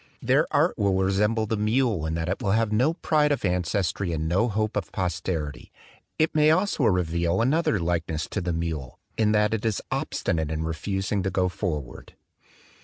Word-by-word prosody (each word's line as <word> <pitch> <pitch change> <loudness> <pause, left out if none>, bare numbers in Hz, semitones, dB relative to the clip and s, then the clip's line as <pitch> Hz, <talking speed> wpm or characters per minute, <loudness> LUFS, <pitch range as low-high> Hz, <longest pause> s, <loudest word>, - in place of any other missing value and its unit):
Their - - +2
art - - +1
will 100 -2 +2
resemble 105 +4 +1
the 110 - -1
mule 105 -5 +1
in 80 - -2
that 80 0 -2
it 95 +7 -2
will 100 -4 +1
have 110 -1 +1
no 130 +10 +2
pride 150 -3 +2
of 140 - 0
ancestry 90 0 0
and 80 0 -2
no 95 +8 +2
hope 110 0 -1
of 100 -5 -3
posterity. 85 -5 -3 0.5
It 155 +1 +2
may 155 0 +4
also 170 -4 +2
reveal 85 -2 +1
another 130 -2 +2
likeness 85 -2 -1
to - - -2
the 90 0 -2
mule, 80 -6 -4 0.2
in 110 -1 +2
that 105 +1 +2
it 110 - -2
is 110 -3 0
obstinate 80 -2 -1
in 80 0 -2
refusing 95 +5 -2
to 95 - -1
go 90 0 +1
forward. 80 - -5
95 Hz, 180 wpm, -25 LUFS, 85-110 Hz, 0.5 s, may